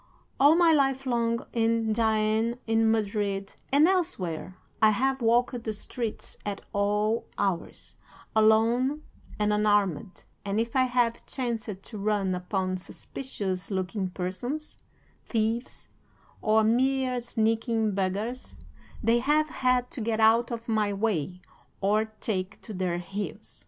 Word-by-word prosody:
All 290 +3 +7
my 340 -1 +5
life 270 -2 +2
long, 235 -2 0
in 225 -1 +1
Jaen, 220 +1 +1
in 225 0 +3
Madrid, 205 -2 -1 0.2
and 290 +4 +6
elsewhere, 185 - -1 0.2
I 215 - +7
have 265 +5 +1
walked 240 +1 +2
the 220 - -2
streets 225 +1 -5
at 205 -1 -4
all 210 +2 +1
hours, 185 -4 -2 0.4
alone 230 +7 +3 0.3
and 210 0 +1
unarmed, 205 -5 +1 0.2
and 200 +1 -1
if 230 +2 -2
I 260 -1 +4
have 245 -2 +1
chanced 225 -6 -3
to 220 - -9
run 200 -2 0
upon 185 +1 -2
suspicious 190 -2 -5
looking 190 0 -2
persons, 195 +12 -4 0.4
thieves, 225 +2 -2 0.5
or 220 0 +3
mere 255 +2 +2
sneaking 225 -1 0
beggars, 200 +6 -3 0.5
they 230 +2 +4
have 300 +4 +2
had 255 -3 +1
to 245 - -5
get 220 0 -1
out 225 +2 +5
of 235 -1 -5
my 215 -2 +1
way 190 -4 -1 0.4
or 210 +2 +2
take 205 -3 -4
to 220 - -8
their 180 -2 -1
heels. 195 +4 -5
220 Hz, 130 wpm, -27 LUFS, 200-240 Hz, 0.5 s, All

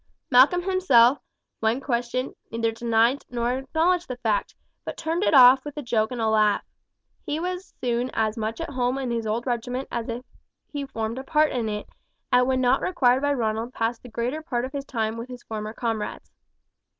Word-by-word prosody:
Malcolm 275 +8 +6
himself, 290 -9 +4 0.4
when 225 +3 +1
questioned, 255 -1 -2 0.2
neither 230 0 0
denied 230 +3 +2
nor 245 +1 -1
acknowledged 330 +6 +1
the 255 - -5
fact, 220 -4 -1 0.3
but - - -6
turned 330 +3 -1
it 310 - +3
off 260 0 +8
with 295 0 -8
a 295 - -4
joke 220 -3 +1
and 250 - -4
a 225 - +1
laugh. 215 -1 +3 0.6
He 295 +2 -2
was 365 +2 -5
soon 245 0 -1
as 215 0 +1
much 225 +2 -3
at 330 - -4
home 255 -1 0
in 260 -3 -2
his 230 -2 -2
old 225 +3 -1
regiment 245 +1 -2
as 235 -1 -3
if 240 +2 -5 0.5
he 285 -1 -3
formed 225 -1 -3
a - - -6
part 300 +2 +2
in 235 -4 -1
it, 210 0 -4 0.5
and 250 0 +5
when 260 -1 +1
not 255 +1 +3
required 260 -8 +2
by 285 0 +2
Ronald 225 -1 -2
passed 230 +1 -1
the 250 - -12
greater 240 +7 -3
part 250 -6 -2
of 260 - -7
his 280 -1 -5
time 225 -3 -2
with 230 +2 -7
his 250 -1 -9
former 215 -1 -5
comrades. 225 -2 -4
245 Hz, 200 wpm, -25 LUFS, 230-275 Hz, 0.6 s, off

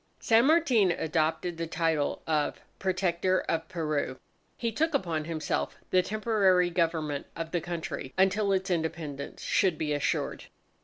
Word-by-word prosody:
_ - - -20
San 230 +2 +5
Martin 280 - +4
adopted 165 +1 0
the 165 0 -3
title 160 -3 0
of 155 -2 0 0.2
"Protector 185 -1 +1
of 165 0 -2
Peru." 150 -6 -2 0.4
He 230 -1 -1
took 310 +6 0
upon 165 - -1
himself 160 -1 -2 0.2
the 185 - +5
temporary 195 -3 +2
government 160 -4 -1
of 165 0 -5
the 175 - 0
country 165 -5 -5
until 195 +2 +3
its 190 0 0
Independence 160 -4 -3
should 185 -5 +2
be 150 -1 -1
assured. 145 - -1
170 Hz, 145 wpm, -29 LUFS, 160-190 Hz, 0.4 s, San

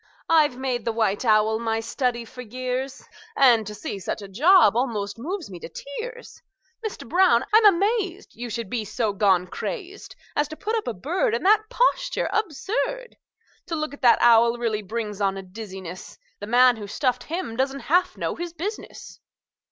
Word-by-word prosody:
I've 305 -6 +4
made 255 -3 -2
the 230 - -1
white 220 -2 0
owl 220 0 +3
my 225 -1 -1
study 235 +1 -2
for 250 +2 -10
years, 255 +3 -4 0.3
And 235 -6 +5
to 210 - -6
see 200 - -5
such 195 +3 -4
a - - -8
job 275 - +5
almost 220 -4 -2
moves 340 - -5
me 180 - -8
to - - -8
tears! 470 - -8 0.4
Mister 435 -2 -6
Brown, 320 -4 +3
I'm 435 0 +7
amazed 400 0 +1
You 240 +1 -7
should 230 -1 -4
be 225 +2 -2
so 215 0 -2
gone 195 -3 +3
crazed 390 - -6 0.2
As 295 - +1
to 310 - -8
put 420 +6 -2
up 445 - -2
a 240 - -2
bird 285 - 0
In 235 - -3
that 430 +2 +4
posture - - +1
absurd! 455 - -2 0.5
To 335 - -2
look 310 -2 -3
at 285 - -12
that 240 -3 +6
owl 235 0 +5
really 225 -3 -1
brings 210 0 -5
on 195 -1 +1
a 195 - -6
dizziness; 190 -2 -9 0.2
The 205 - -7
man 245 +1 +5
who 205 -2 -7
stuffed 250 +4 -1
him 325 -8 -4
don't 270 +2 -1
half 355 +4 +1
know - - -2
his 345 -1 -6
business!" 395 +6 -7
250 Hz, 185 wpm, -24 LUFS, 220-350 Hz, 0.5 s, I'm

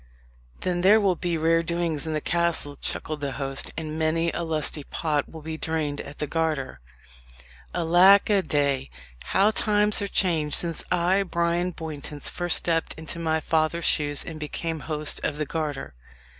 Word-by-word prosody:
"Then 180 -1 -1
there 205 +4 +6
will 195 -3 +3
be 170 0 -2
rare 165 +1 +3
doings 170 -2 -2
in 160 - -2
the 155 - -1
castle," 170 -4 0
chuckled 155 +1 -4
the 140 -2 -3
host; 135 +2 -3
"and 155 0 -4
many 165 +1 +1
a - - -3
lusty 155 -2 0
pot 150 -1 -2
will 160 -2 -10
be 160 0 -5
drained 155 -3 -2
at 140 - -10
the 150 - -2
Garter. 155 -3 -2 0.9
Alack 180 - +5
a 205 -2 +3
day! 140 -5 0 0.4
how 200 +3 +3
times 210 -1 +2
are 200 - -1
changed 160 -7 +1
since 170 -2 +3
I, 180 +2 +2
Bryan 170 -1 0
Bowntance, 150 -3 -5
first 175 -1 +3
stepped 165 -1 -1
into 160 +1 -7
my 160 -1 0
father's 160 +1 0
shoes, 145 -2 +1
and 160 -1 -7
became 160 +2 -4
host 150 -1 -2
of 145 - -1
the 150 - -1
Garter. 150 - -4
160 Hz, 170 wpm, -25 LUFS, 150-170 Hz, 0.9 s, there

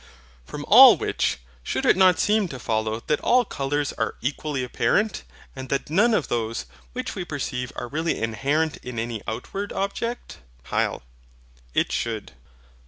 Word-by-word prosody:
From - - -7
all - - +10
which, - - -1 0.2
should - - -2
it - - +5
not 185 -2 +5
seem 210 -1 +2
to 135 - -7
follow 110 -1 -1
that 150 - +1
all 250 0 +4
colours 145 -3 -2
are 110 - -2
equally 140 +1 -2
apparent, 205 - 0 0.3
and 130 -1 -7
that 140 +1 -2
none 210 +7 +4
of 160 - 0
those 115 - -2 0.3
which - - -4
we 185 - -4
perceive 130 -6 -4
are 120 - -5
really 160 +5 -1
inherent 140 +8 0
in 125 -1 -8
any 115 -1 -3
outward 160 - -4
object? 200 - -4 0.3
HYL. - - 0 0.7
It - - +2
should. 115 -3 -3
140 Hz, 155 wpm, -24 LUFS, 115-185 Hz, 0.7 s, all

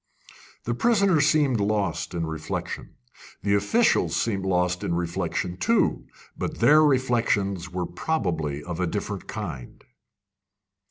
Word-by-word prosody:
The 120 - -1
prisoner 200 - +3
seemed 145 -5 +3
lost 100 -6 -1
in 85 -1 -1
reflection. 80 -1 -5 0.5
The 100 - +1
officials 160 - +2
seemed 100 -4 -1
lost 90 -1 +1
in 85 - -1
reflection 90 +1 -2
too; 230 - +1 0.3
but - - -4
their 155 +1 +6
reflections 115 - +1
were 90 0 -2
probably 80 - -2
of 85 0 -5
a 90 - +1
different 100 +1 -4
kind. 80 - -7
100 Hz, 120 wpm, -25 LUFS, 85-130 Hz, 0.5 s, their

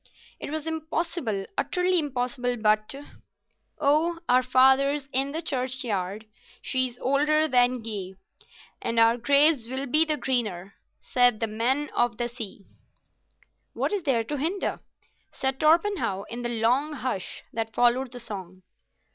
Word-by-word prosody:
It - - -6
was 310 0 -4
impossible, 320 - -3
utterly 360 -1 +1
impossible, 250 -3 -2
but— 215 +2 +1 0.8
"'Oh, 315 +4 +2
our 250 +1 +4
fathers 265 +2 +3
in 270 +2 +1
the 325 +3 -4
churchyard, 235 -7 -2 0.3
She 260 -1 +2
is 245 -1 -12
older 300 +4 +2
than 250 -3 +2
ye, 195 -4 -5 0.7
And 230 0 -3
our 230 +1 +5
graves 280 0 +3
will 265 +2 -3
be 305 +5 +4
the 310 -2 0
greener,' 215 -8 -2 0.3
Said 245 -3 +3
The 225 - +1
Men 245 +7 0
of 240 -2 +1
the 240 - -1
Sea." 220 -5 -8 1.1
"What - - -1
is 405 - 0
there 260 -8 +1
to 295 +6 -4
hinder?" 335 +8 -2 0.5
said 265 0 -2
Torpenhow, 320 - +2
in 240 +1 -5
the 240 - -2
long 245 +6 +1
hush 255 -9 -4
that 225 -1 -4
followed 245 +1 +2
the 250 - -8
song. 185 -5 -7
255 Hz, 140 wpm, -26 LUFS, 230-295 Hz, 1.1 s, our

